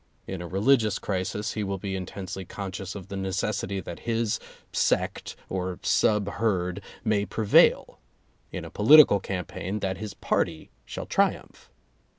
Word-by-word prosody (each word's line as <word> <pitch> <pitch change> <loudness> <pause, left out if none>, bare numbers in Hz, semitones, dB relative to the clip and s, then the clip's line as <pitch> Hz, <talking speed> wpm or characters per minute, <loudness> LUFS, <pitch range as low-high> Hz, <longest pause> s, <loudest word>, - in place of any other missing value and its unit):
In 95 -2 -5
a 85 - -6
religious 105 +3 +3
crisis 100 +2 -2
he 105 - -2
will 100 -1 -2
be 95 0 -4
intensely 95 +1 -6
conscious 95 +1 -6
of 100 -2 -8
the 100 - -5
necessity 95 0 -2
that 85 - -8
his 115 -2 0 0.3
sect - - 0
(or 90 -1 -3
sub 105 -2 +2
herd) 100 -4 -1 0.2
may 105 -3 +2
prevail; 105 0 +3 0.5
in - - -5
a - - -9
political 120 -1 +7
campaign, 95 +1 -4
that 95 -1 -2
his 105 -1 -6
party 80 -2 -1 0.2
shall - - -5
triumph. - - -1
100 Hz, 145 wpm, -26 LUFS, 95-105 Hz, 0.5 s, political